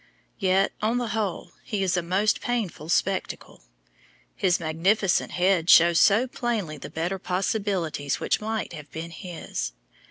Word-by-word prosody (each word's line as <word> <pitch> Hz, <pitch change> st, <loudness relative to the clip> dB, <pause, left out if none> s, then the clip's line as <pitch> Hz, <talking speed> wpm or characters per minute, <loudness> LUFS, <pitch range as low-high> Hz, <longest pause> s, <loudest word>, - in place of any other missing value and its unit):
Yet, 195 Hz, -1 st, +2 dB
on 225 Hz, +3 st, +1 dB
the 245 Hz, -2 st, -2 dB
whole, 210 Hz, -5 st, -3 dB
he 205 Hz, -3 st, -2 dB
is 185 Hz, -1 st, +1 dB
a 175 Hz, -, +1 dB
most 190 Hz, +5 st, +1 dB
painful 215 Hz, -10 st, -3 dB
spectacle. 190 Hz, +2 st, -1 dB, 0.7 s
His 180 Hz, -2 st, +2 dB
magnificent 175 Hz, +5 st, +1 dB
head 180 Hz, -2 st, +2 dB
shows 170 Hz, 0 st, +7 dB
so 215 Hz, +5 st, +5 dB
plainly 225 Hz, -, -3 dB
the -, -, -8 dB
better 175 Hz, +4 st, -3 dB
possibilities 180 Hz, -7 st, -1 dB
which -, -, 0 dB
might 220 Hz, -3 st, -3 dB
have 150 Hz, -3 st, -9 dB
been 165 Hz, +1 st, -6 dB
his. 175 Hz, -1 st, -5 dB
190 Hz, 145 wpm, -25 LUFS, 170-215 Hz, 0.7 s, shows